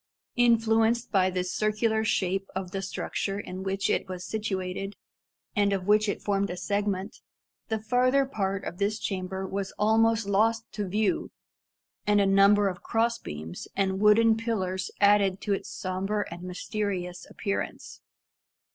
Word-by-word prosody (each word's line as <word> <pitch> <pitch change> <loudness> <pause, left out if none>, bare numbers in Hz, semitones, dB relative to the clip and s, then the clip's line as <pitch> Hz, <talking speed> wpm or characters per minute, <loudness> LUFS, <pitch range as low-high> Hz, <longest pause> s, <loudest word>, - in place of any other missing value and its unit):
Influenced 230 0 +3
by 185 -2 +3
the 185 -1 -1
circular 215 +4 0
shape 195 -2 0
of 190 -1 -4
the 195 -1 -3
structure 195 +1 -3
in 185 -2 -6
which 195 +1 -1
it - - 0
was 180 -1 -5
situated, 195 -2 -3 0.6
and 205 -1 +3
of 195 -2 -1
which 210 +1 +4
it - - -3
formed 200 -1 0
a 180 - -4
segment, 200 +2 -2 0.5
the 220 - 0
farther 250 +5 +2
part 195 -7 -2
of 175 - -6
this 205 +2 +1
chamber 190 -2 -3
was 195 0 -4
almost 225 +1 +3
lost 220 +3 +2
to 205 -2 -3
view, 205 +2 0 0.8
and 205 0 +4
a 200 - +4
number 200 +1 +5
of 180 -2 -4
cross 230 +1 0
beams 80 +3 -7
and 190 -1 0
wooden 220 +2 +5
pillars 190 -5 -2
added 200 -2 +4
to 205 - 0
its 195 - -4
sombre 195 +2 -2
and 175 - -9
mysterious 180 -1 -4
appearance. 100 -1 -4
200 Hz, 150 wpm, -27 LUFS, 190-220 Hz, 0.8 s, number